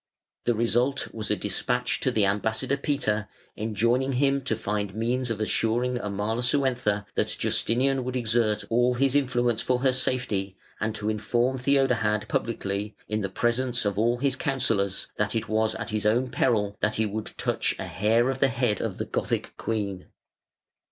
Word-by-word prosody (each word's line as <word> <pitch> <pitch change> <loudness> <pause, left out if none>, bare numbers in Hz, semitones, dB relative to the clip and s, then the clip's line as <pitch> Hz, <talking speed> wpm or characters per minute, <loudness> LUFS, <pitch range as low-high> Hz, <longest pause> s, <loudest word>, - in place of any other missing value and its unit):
The 120 - +2
result 120 +4 +1
was 110 -1 -3
a 105 - +2
despatch 125 +6 -1
to - - +1
the 110 -5 +2
ambassador 110 +6 0
Peter 125 -8 -1 0.3
enjoining 115 +5 0
him 135 +2 +2
to 115 - +1
find 105 -2 -3
means 120 +3 -1
of 115 -2 -2
assuring 120 +3 +1
Amalasuentha 115 +1 0
that - - 0
Justinian 130 +3 +1
would 130 +1 -4
exert 115 -3 +1
all 120 +2 +3
his 135 +1 +2
influence 125 -5 +1
for 125 - +1
her 130 -1 +3
safety, 115 -7 -1 0.2
and 110 0 -1
to 105 - -4
inform 120 +4 0
Theodahad 125 -5 +2
publicly, 105 -2 -2
in 110 0 -1
presence 120 +3 0
of 100 0 0
all 120 +2 +2
his 135 +1 +1
counsellors, 115 - 0
that 105 +2 0
it 115 -1 -1
was 110 +1 +1
at 115 0 -4
his 105 -1 0
own 125 +4 +1
peril 105 -5 +1
that 105 - +1
he 110 - +1
would 105 +1 -4
touch - - 0
a - - -4
hair 115 +5 +2
of 135 - -5
the 135 - +4
head 120 -5 0
of - - -3
the - - -3
Gothic - - -2
queen. 100 -4 -3
115 Hz, 165 wpm, -26 LUFS, 105-125 Hz, 0.3 s, the